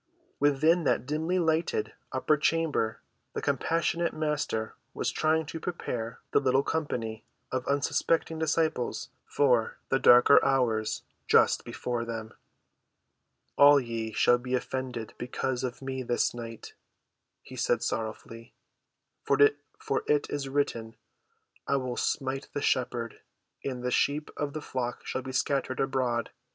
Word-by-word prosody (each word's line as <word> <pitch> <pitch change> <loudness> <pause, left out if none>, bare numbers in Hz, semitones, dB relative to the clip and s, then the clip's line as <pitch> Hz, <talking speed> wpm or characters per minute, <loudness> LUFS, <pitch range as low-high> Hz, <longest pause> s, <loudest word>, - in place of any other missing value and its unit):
Within 155 +4 +3
that 125 - +1
dimly‐lighted 160 -2 0 0.2
upper 130 +3 +2
chamber 150 -7 0 0.3
the - - -3
compassionate 170 +1 0
Master 150 -8 -2 0.2
was - - -1
trying 160 0 +1
to 160 +2 -6
prepare 125 -9 -4
the - - +4
little 135 0 +2
company 115 -9 -3 0.3
of 130 -1 -2
unsuspecting 160 +3 +1
disciples 160 -5 0 0.2
for 125 -6 +2
the 135 - +2
darker 125 +3 +7
hours 120 -5 +1 0.2
just - - +4
before 120 -1 -3
them. 115 -1 -6 1.3
"All 145 0 +8
ye 115 -3 -4
shall 120 +3 +4
be 125 +1 -2
offended 125 -3 -4
because 125 +1 -2
of 130 +1 -4
me 130 0 -3
this 120 -1 0
night," 115 -2 -8 0.7
he 130 - -11
said 120 -1 +1
sorrowfully. 115 +1 -5 0.7
"For - - +1
it 430 0 +1
is 140 -2 -3
written, 115 -5 -1 0.7
I - - +2
will 130 -2 -2
smite 135 +1 -2
the 145 - -2
shepherd, 120 -2 -1 0.4
and 125 -3 -4
the 125 - -1
sheep 145 +4 +1
of 145 -1 -3
the 155 - -4
flock 125 -2 -4
shall 130 - -3
be 130 0 -6
scattered 130 0 0
abroad. 130 -3 0
130 Hz, 130 wpm, -29 LUFS, 120-150 Hz, 1.3 s, All